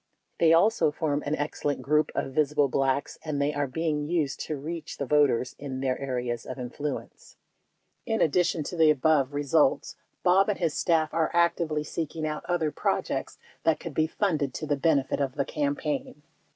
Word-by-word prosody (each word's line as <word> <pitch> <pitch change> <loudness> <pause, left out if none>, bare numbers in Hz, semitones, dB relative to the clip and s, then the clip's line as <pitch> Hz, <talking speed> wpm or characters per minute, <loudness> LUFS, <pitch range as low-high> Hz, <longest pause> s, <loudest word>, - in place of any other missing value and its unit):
They 165 -1 +5
also 170 0 +4
form 150 -1 -1
an 150 - +1
excellent 145 -1 -2
group 150 +1 +2
of 135 - -2
visible 150 0 +2
Blacks 135 +1 -1
and 150 -3 -2
they 145 +1 +1
are 145 -1 -1
being 150 +1 -2
used 160 -6 0
to 155 - -3
reach 160 +3 -6
the 140 - -2
voters 135 -3 +2
in 135 -2 -5
their 130 -1 +1
areas 125 -3 -3
of 130 - -7
influence. 135 +4 -6 0.7
49 225 - +1
In - - +5
addition 165 0 +1
to 175 - -6
the 160 -2 +5
above 145 -1 +2
results, 145 -2 +2 0.3
Bob 190 +3 +4
and 210 - 0
his 165 -4 0
staff 160 -3 +1
are 165 -1 +1
ac 170 0 +4
tively 155 -2 -2
seeking 160 0 -4
out 150 -1 -3
other 170 -4 0
projects - - -2 0.3
that 160 - +2
could 165 - -7
be 155 +2 +2
funded 155 -7 -1
to - - -4
the 145 -1 +1
benefit 140 -1 +1
of 135 -2 -1
the 140 -1 0
campaign. 145 0 -3
150 Hz, 185 wpm, -27 LUFS, 140-160 Hz, 0.7 s, They